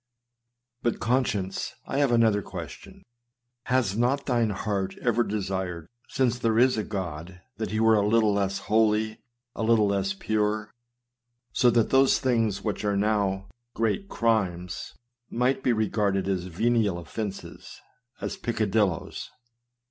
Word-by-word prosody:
But, 120 - -1
conscience, 110 -6 -1
I 135 - -2
have 140 -3 +3
another 110 -3 +3
question! - - -9 0.6
Has 125 -6 +1
not 125 +5 +1
thine 120 -4 +1
heart 100 -1 -2
ever 120 -1 +1
desired, 95 -5 -3 0.2
since 130 -6 +1
there 115 -1 +1
is 125 +2 +5
a 110 - -1
God, 90 -2 -5 0.2
that 110 - -3
he 110 - -1
were 110 0 +5
a 105 -2 +3
little 110 -1 +3
less 100 -1 0
holy, 110 0 +2 0.4
a - - -4
little 110 -1 +4
less 100 -1 0
pure, 105 +1 -1 0.8
so 125 - +4
that 115 -2 +2
those 135 0 +5
things 115 -6 0
which 105 -2 -2
are 100 -1 +1
now 100 -2 0 0.3
great 115 - -1
crimes 95 -7 -1 0.3
might 130 +3 +1
be 125 - +2
regarded 105 -3 0
as 95 -2 -1
venial 105 +1 +1
offences, 95 0 -7 0.4
as - - -4
peccadillos? 105 -6 -1
110 Hz, 135 wpm, -26 LUFS, 100-115 Hz, 0.8 s, is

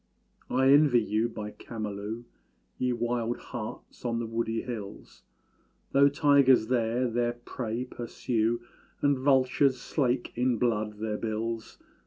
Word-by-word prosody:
I 130 +1 +4
envy 140 -4 +6
you 110 +1 0
by 105 -2 -6
Camalú, 105 0 -6 0.6
Ye 125 0 +1
wild 120 0 -1
harts 120 -4 -8
on 120 -2 -1
the 115 - -2
woody 115 0 -2
hills; 110 -5 -8 0.7
Though 140 +1 +6
tigers 140 -5 +4
there 120 0 +1
their 120 0 0
prey 120 0 -4
pursue, 120 -1 -1 0.4
And 145 -1 +4
vultures 130 0 +3
slake 125 -3 -1
in 125 0 +1
blood 105 -3 0
their 105 0 -2
bills. 115 +1 -3
120 Hz, 125 wpm, -28 LUFS, 110-130 Hz, 0.7 s, envy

